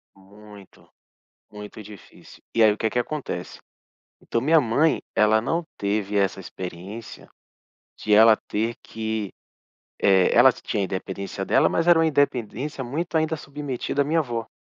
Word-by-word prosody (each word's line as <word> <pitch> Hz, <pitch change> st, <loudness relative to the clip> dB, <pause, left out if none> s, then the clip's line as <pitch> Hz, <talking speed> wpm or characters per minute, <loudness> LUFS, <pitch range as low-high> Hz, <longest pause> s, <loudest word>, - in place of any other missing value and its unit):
Muito, 100 Hz, 0 st, -17 dB, 0.6 s
muito 105 Hz, +1 st, -10 dB
difícil. 105 Hz, -2 st, -15 dB
E 115 Hz, -, +3 dB
aí 110 Hz, -, +6 dB
o 105 Hz, -, -5 dB
que 110 Hz, -2 st, 0 dB
que 125 Hz, -, -2 dB
acontece? 120 Hz, -9 st, -4 dB, 0.6 s
Então 115 Hz, -, -2 dB
minha 155 Hz, +5 st, +4 dB
mãe, 145 Hz, +6 st, +1 dB
ela 110 Hz, +1 st, +4 dB
não 165 Hz, +9 st, -1 dB
teve 100 Hz, 0 st, -1 dB
essa 95 Hz, -1 st, +1 dB
experiência 95 Hz, +4 st, -9 dB, 0.7 s
de 105 Hz, -, 0 dB
ela 110 Hz, +1 st, +7 dB
ter 115 Hz, +3 st, -2 dB
que, 110 Hz, -3 st, -4 dB, 0.7 s
eh, 95 Hz, -2 st, +4 dB
ela -, -, +7 dB
t -, -, -16 dB
tinha 100 Hz, -, -1 dB
independência 95 Hz, +1 st, -5 dB
dela, -, -, +3 dB
mas 165 Hz, -, 0 dB
era 170 Hz, -1 st, +7 dB
uma 165 Hz, -, +3 dB
independência 135 Hz, -1 st, -1 dB
muito 160 Hz, +7 st, -3 dB
ainda 160 Hz, 0 st, +1 dB
submetida 140 Hz, -1 st, -3 dB
à -, -, -3 dB
minha 160 Hz, +3 st, +1 dB
vó 115 Hz, -4 st, -5 dB
110 Hz, 150 wpm, -24 LUFS, 100-145 Hz, 0.7 s, ela